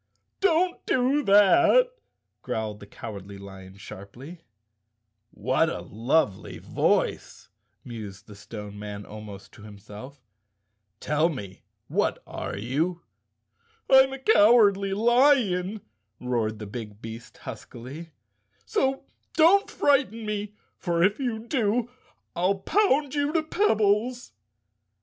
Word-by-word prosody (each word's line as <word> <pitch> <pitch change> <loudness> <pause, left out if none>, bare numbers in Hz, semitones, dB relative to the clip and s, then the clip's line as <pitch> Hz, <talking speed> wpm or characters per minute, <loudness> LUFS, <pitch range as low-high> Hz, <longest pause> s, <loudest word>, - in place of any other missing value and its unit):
" - - -52
Don't 355 +2 0
do 265 +3 +2
that," 335 - +5 0.5
growled 110 -2 -4
the 100 - -12
Cowardly 100 -2 -9
Lion 95 -1 -12
sharply. 120 - -11 0.5
" 110 -1 -52
What 130 +10 0
a - - -5
lovely 115 -1 -1
voice," - - -1 0.3
mused 105 -4 -9
the 105 - -13
Stone 105 0 -9
Man 105 -1 -7
almost 105 -2 -10
to - - -16
himself. 105 +6 -11 0.8
"Tell 155 +3 +1
me, 100 - -8 0.3
what - - 0
are - - -6
you?" 155 - -2 0.9
"I'm 265 0 +7
a 270 - -5
Cowardly 205 - +4
Lion," 220 -5 +3 0.4
roared 115 -3 -1
the 105 - -7
big 105 -1 -8
beast 115 +1 -10
huskily, 130 +6 -9 0.3
" 105 0 -48
so 265 - 0 0.3
don't 355 +5 +5
frighten 260 -6 +1
me, 210 0 -4 0.2
for 170 -2 0
if 200 +6 +2
you 245 -5 -1
do 235 -1 0 0.4
I'll 185 +3 +1
pound 290 - +1
you 290 0 0
to 325 -2 +1
pebbles." 240 - +1
165 Hz, 115 wpm, -26 LUFS, -, 0.9 s, I'm